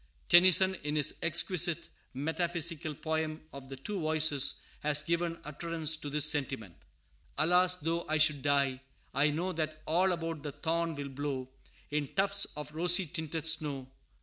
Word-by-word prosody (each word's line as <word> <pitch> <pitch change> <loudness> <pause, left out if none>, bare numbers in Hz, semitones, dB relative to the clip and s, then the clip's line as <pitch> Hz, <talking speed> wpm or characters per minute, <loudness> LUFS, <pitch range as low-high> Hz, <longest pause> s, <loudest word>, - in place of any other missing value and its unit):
Tennyson, 185 +2 +6
in 150 +1 -3
his 150 -1 +2
exquisite 170 0 +3 0.3
metaphysical 160 +1 -2
poem 160 +1 -2
of 135 -1 -10
the 135 - -6
Two 190 +10 -5
Voices, 155 -3 +1 0.2
has 150 0 0
given 170 0 -1
utterance 160 +1 -1
to 150 -2 -7
this 150 +1 +4
sentiment: 135 - +1 0.6
"Alas! 180 +3 +4
though 165 0 -3
I 155 - +2
should 150 -2 +4
die, 140 -2 +1 0.3
I 145 +2 +3
know 170 +5 -2
That 155 -2 -4
all 180 +4 +2
about 165 -3 -4
the 145 -1 -6
thorn 165 +2 -2
will 140 -1 -6
blow 135 -1 -4 0.4
In 150 -1 -1
tufts 200 0 +2
of 150 0 -7
rosy 175 +3 +3
tinted 160 -1 -5
snow. 145 -5 +1
155 Hz, 150 wpm, -31 LUFS, 145-170 Hz, 0.6 s, Tennyson